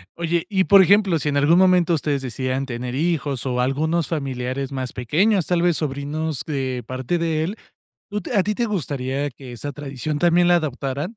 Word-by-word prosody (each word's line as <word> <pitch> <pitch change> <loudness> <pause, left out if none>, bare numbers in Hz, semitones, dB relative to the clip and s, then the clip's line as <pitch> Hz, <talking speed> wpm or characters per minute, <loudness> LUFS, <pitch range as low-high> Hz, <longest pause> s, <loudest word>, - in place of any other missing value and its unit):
Oye, 170 0 -1
y, 190 -2 +2
por 200 -1 +7
ejemplo, 195 -3 +4
si 150 - -1
en 145 - 0
algún 150 +5 +4
momento 180 -2 +4
ustedes 145 -3 0
decidieran 130 +1 -2
tener 125 0 -5
hijos, 145 -4 -1
o 125 -1 0
algunos 155 +6 0
familiares 135 -3 -3
más 130 -2 -4
pequeños, 175 - +1
tal 175 -1 +1
vez, 175 -2 +2
sobrinos 150 +1 -3
de 130 -5 -3
parte 130 +7 -2
de 160 -2 0
él, 195 +6 -3 0.5
¿tú 210 0 -3
a 195 - +4
ti 210 - -1
te 240 - 0
gustaría 140 - -2
que 125 0 -11
esa 145 +5 -5
tradición, 145 +1 -4
también 175 0 +4
la 175 - +5
adoptaran? 140 -2 -3
150 Hz, 190 wpm, -22 LUFS, 135-175 Hz, 0.5 s, por